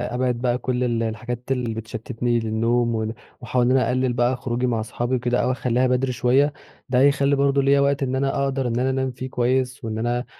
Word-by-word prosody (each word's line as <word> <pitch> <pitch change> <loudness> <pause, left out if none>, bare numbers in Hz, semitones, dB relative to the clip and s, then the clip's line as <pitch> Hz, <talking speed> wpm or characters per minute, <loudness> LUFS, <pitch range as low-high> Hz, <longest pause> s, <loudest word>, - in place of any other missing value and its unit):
أبعد 125 0 +1
بقى 125 -1 +1
كُل 125 0 -1
ال 120 -2 0
الحاجات 115 +2 -4
اللي 125 -3 -1
بتشتّتني 115 +2 -2
للنوم 115 +1 0
ون 110 0 -2 0.3
وأحاول 120 +1 +1
إن 125 - +2
أنا 130 -3 +3
أقلّل 130 0 +1
بقى 120 +2 +1
خروجي 125 0 -2
مع 115 -2 0
أصحابي 120 +3 -2
وكده 125 0 0
أو 125 - +1
أخلّيها 125 0 +1
بدري 125 +1 +1
شوية، 135 +4 +2 0.4
ده 125 -1 +2
هيخلّي 140 +1 +4
برضه 140 0 +2
ليّا 140 +1 +4
وقت 140 0 +2
إن 130 -1 -1
أنا 140 +1 0
أقدر 135 -1 -1
إن 120 0 -1
أنا 130 +1 +1
أنام 130 0 -1
فيه 130 +1 -7
كويس 125 +1 0
وإن 110 -1 -3
أنا 120 +2 -1
125 Hz, 215 wpm, -23 LUFS, 120-130 Hz, 0.4 s, هيخلّي